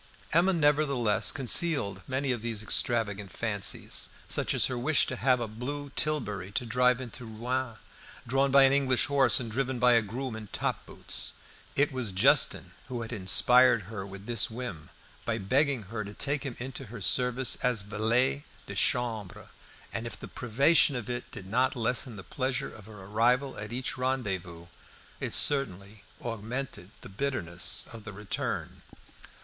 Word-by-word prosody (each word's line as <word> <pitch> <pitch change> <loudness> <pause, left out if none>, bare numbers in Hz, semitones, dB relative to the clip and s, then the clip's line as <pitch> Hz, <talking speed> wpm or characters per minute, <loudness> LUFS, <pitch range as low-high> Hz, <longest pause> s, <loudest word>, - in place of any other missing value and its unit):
Emma 175 +4 +5
nevertheless 145 - +2
concealed 130 - +2
many 130 +1 -1
of 120 -3 -2
these 115 -2 -3
extravagant 105 -3 +1
fancies, 105 -4 -1 0.2
such - - 0
as - - +4
her 130 - -2
wish 145 +6 +3
to 130 - -4
have 130 0 +2
a 120 - -2
blue 140 +6 -6
tilbury 105 -11 -2
to 120 - -2
drive 125 +2 +3
into 125 0 -7
Rouen, 120 +2 -3 0.5
drawn 135 +3 +2
by 135 0 +7
an 135 0 +5
English 135 -3 +3
horse 135 -4 +4
and 115 -3 -5
driven 130 +2 -1
by 125 0 +5
a 115 - +5
groom 120 +3 -5
in 110 -1 -8
top - - -3
boots. - - -1 0.4
It 145 +1 +2
was 125 -7 -3
Justin 95 - +2 0.2
who 125 -3 -4
had 115 - -7
inspired 120 +3 +5
her 100 +1 -6
with 100 0 -10
this 115 -2 +1
whim, 110 -10 -6 0.3
by 115 -1 -1
begging 130 +4 +1
her 105 +2 -5
to 100 +1 -9
take 140 0 -1
him 125 - -6
into 130 +2 -6
her 115 +1 -9
service 125 +4 +3
as 125 -5 0
valet 115 +7 +1 0.2
de - - -7
chambre, 110 -1 -1 0.4
and 115 +1 -3
if - - -8
the - - -8
privation 135 +5 +3
of 125 -1 -4
it 120 0 -5
did 95 - -9
not 125 +8 +1
lessen 120 0 0
the 95 - -9
pleasure 130 +6 -3
of 105 -2 -13
her 105 -3 -11
arrival 120 +7 +1
at 105 +1 -6
each 125 +1 -3
rendezvous, 95 -10 -2 0.5
it - - -3
certainly 100 -7 +1 0.2
augmented 115 -3 -5
the - - -10
bitterness 95 -6 -1
of 115 -2 -10
the 105 - -7
return. 100 +1 -4
Manservant. - - -19
120 Hz, 170 wpm, -29 LUFS, 105-130 Hz, 0.5 s, by